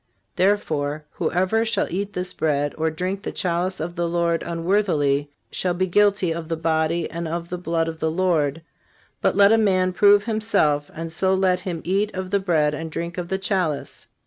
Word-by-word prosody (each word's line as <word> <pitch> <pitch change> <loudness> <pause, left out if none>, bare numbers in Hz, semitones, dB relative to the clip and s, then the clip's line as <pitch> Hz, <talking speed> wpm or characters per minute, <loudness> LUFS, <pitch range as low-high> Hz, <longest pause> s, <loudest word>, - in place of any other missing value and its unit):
Therefore, 155 -6 0
whoever 190 +6 0
shall 230 - +1
eat 200 +3 -3
this 180 0 -4
bread, 145 -2 0
or 160 0 0
drink 185 +5 -3
the - - -4
chalice 180 +1 -1
of 170 +2 -4
the 170 0 -1
Lord 170 -1 +1
unworthily, 165 -5 0 0.2
_shall 180 -1 -1
be 185 - +2
guilty 200 -1 +2
of 165 0 -4
the 165 0 -2
body 160 +1 0
and 170 0 -4
of 170 +1 -3
__ - - -26
the 180 - -4
blood 165 -1 -1
of 160 -1 -5
the 160 0 0
Lord_. 165 -4 +1 0.6
But - - +2
let 200 0 +6
a 225 - +5
man 185 -3 +2
prove 205 +2 +5
himself; 215 -10 +1
and 165 0 -6
so 190 +3 +2
let 185 -1 +2
him 180 -3 -5
eat 200 +4 0
of 185 0 -4
that 200 - +3
bread 155 -5 +2
and 160 +2 -5
drink 170 +3 -4
of 175 - -4
the 190 - -1
chalice. 185 -6 -2
175 Hz, 200 wpm, -23 LUFS, 160-190 Hz, 0.6 s, let